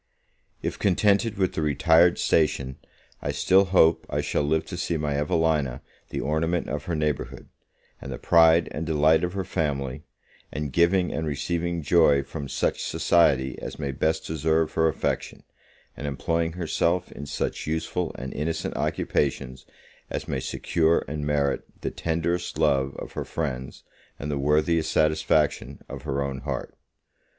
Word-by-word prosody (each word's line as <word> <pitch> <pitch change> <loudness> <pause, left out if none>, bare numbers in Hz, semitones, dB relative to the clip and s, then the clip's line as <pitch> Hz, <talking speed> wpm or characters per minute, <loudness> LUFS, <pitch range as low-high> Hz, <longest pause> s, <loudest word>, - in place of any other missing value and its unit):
If - - -3
contented 100 +2 +2
with 95 -2 0
a - - 0
retired 80 +3 +4
station, 70 -4 +1 0.4
I - - -2
still 95 +1 +4
hope 85 -3 +3
I - - -1
shall - - 0
live 80 +2 +1
to - - -7
see 85 - -1
my 75 -2 -1
Evelina 75 -3 0 0.3
the - - -3
ornament 80 +4 0
of 75 -1 -4
her 85 - -2
neighbourhood, 75 -2 -3 0.5
and 70 - -7
the 60 - -4
pride 80 +1 +5
and 80 - -4
delight 80 +1 +3
of 90 0 -1
her 95 -1 -2
family; 70 -5 -2 0.5
and 75 -2 -4
giving 90 +3 +3
and 80 0 -2
receiving 85 +3 -2
joy 75 -3 +4
from 70 0 -7
such - - -1
society 70 -7 +2
as - - -6
may 70 -2 -3
best 80 +4 -1
deserve 80 0 0
her 80 0 +3
affection, 80 - -2 0.5
and 75 - -5
employing 80 +5 -1
herself 85 +1 0
in 70 - -8
such - - -3
useful 80 +2 -2
and 65 +1 -6
innocent 80 +3 -3
occupations 65 -2 -1 0.4
as - - -4
may 65 - -2
secure 80 +5 +1
and 75 0 -4
merit 70 -2 +1 0.2
the - - -2
tenderest 85 0 -2
love 70 -3 +2
of - - -7
her - - -4
friends, 65 -5 -4 0.3
and 75 +1 -4
the 70 - -1
worthiest 75 +3 +2
satisfaction 80 -1 +1
of - - -7
her 70 +1 -2
own 70 -1 -4
heart. - - -5
80 Hz, 155 wpm, -25 LUFS, 70-85 Hz, 0.5 s, pride